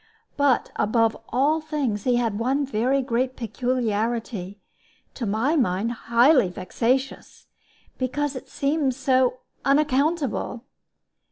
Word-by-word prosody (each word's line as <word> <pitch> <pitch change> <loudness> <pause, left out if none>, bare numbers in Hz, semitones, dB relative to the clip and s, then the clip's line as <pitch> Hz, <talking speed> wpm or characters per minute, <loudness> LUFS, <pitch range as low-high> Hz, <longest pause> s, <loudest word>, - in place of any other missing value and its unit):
But 280 -3 +2
above 225 +1 +2
all 290 +6 +2
things 280 -10 -2
he 250 -1 +3
had 230 -4 0
one 270 +5 +1
very 260 +2 +1
great 255 +1 -1
peculiarity, 230 -4 -2 0.5
to 235 - -4
my 225 +10 +1
mind 225 - +1
highly 240 - +3
vexatious, 235 +9 -2 0.5
because 285 +2 -1
it 255 - -8
seemed 280 -2 0
so 255 -1 +1 0.2
unaccountable. 280 -3 +1
255 Hz, 105 wpm, -24 LUFS, 230-275 Hz, 0.5 s, he